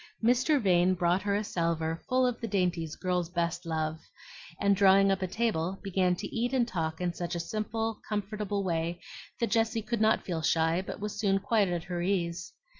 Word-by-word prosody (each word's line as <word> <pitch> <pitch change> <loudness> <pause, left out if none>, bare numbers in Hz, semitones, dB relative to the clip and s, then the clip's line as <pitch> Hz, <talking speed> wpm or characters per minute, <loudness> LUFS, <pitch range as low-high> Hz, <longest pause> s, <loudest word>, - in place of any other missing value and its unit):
Mr. 255 +6 +3
Vane 185 -3 +3
brought 175 +1 +2
her 200 0 0
a 210 - 0
salver 165 -3 -1
full 255 0 +3
of 245 -2 -1
the 230 - -2
dainties 180 -6 -1
girls 180 -2 -1
best 170 -1 -2
love, 160 -1 -2 0.6
and 200 0 +3
drawing 195 0 +5
up 195 0 0
a 185 - 0
table 190 -3 -1
began 185 -2 +1
to - - -6
eat 240 +2 0
and 245 -3 +2
talk 160 -6 -3
in 180 -1 -1
such 175 0 -4
a - - -2
simple, 220 +4 -3
comfortable 205 -1 -2
way 170 -1 -1 0.4
that 235 - 0
Jessie 225 0 +1
could 225 +1 -2
not 220 0 +3
feel 170 -3 -2
shy, 165 +2 +2
but 190 - -7
was 210 0 -5
soon 195 -2 +2
quite 205 +1 +2
at 175 -2 -2
her 175 -1 -4
ease. 180 -1 -1
190 Hz, 195 wpm, -29 LUFS, 170-215 Hz, 0.6 s, drawing